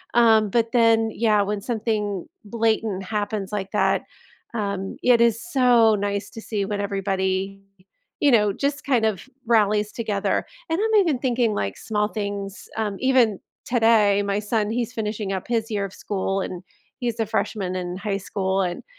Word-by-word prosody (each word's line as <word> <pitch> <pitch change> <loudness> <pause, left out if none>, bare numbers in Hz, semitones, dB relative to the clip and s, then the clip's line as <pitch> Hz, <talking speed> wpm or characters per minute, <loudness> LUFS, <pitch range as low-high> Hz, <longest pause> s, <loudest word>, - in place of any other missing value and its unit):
um, 220 -3 +5
but 230 +2 +1
then, 225 -2 +4
yeah, 215 -3 +2
when 205 0 -2
something 210 -4 -2 0.2
blatant 220 -3 0
happens 205 0 -3
like 195 -2 -3
that, 210 - +1 0.5
um, 200 -3 -3
it 245 -2 +5
is 230 -1 +3
so 250 -9 +4
nice 200 0 -2
to 225 - -9
see 205 -3 -2
when 205 0 -2
everybody, 195 -1 -1 0.6
you 285 - +4
know, 210 -3 +4
just 280 +6 -2
kind 250 -5 +2
of 220 +4 -2 0.2
rallies 210 -2 +2
together, 210 -4 -1 0.2
and 325 +3 -1
I'm 440 0 +2
even 310 -9 +1
thinking, 240 -4 +1
like, 100 - -2
small 210 -1 -1
things, 200 -2 -5
um, 210 -3 -2
even 250 -6 +3 0.3
today, 225 -4 +4
my 200 0 0
son 210 0 -1
he's 240 +1 -2
finishing 210 -3 -3
up 190 -1 -4
his 230 -1 -1
year 205 -2 -1
of 195 - -8
school 195 -1 -2
and 180 -1 -5 0.4
he's 235 -2 -2
a 225 - +1
freshman 200 -3 -2
in 180 0 -4
high 195 0 -2
school, 190 0 -1
and, 175 -2 -3
210 Hz, 170 wpm, -23 LUFS, 200-230 Hz, 0.6 s, um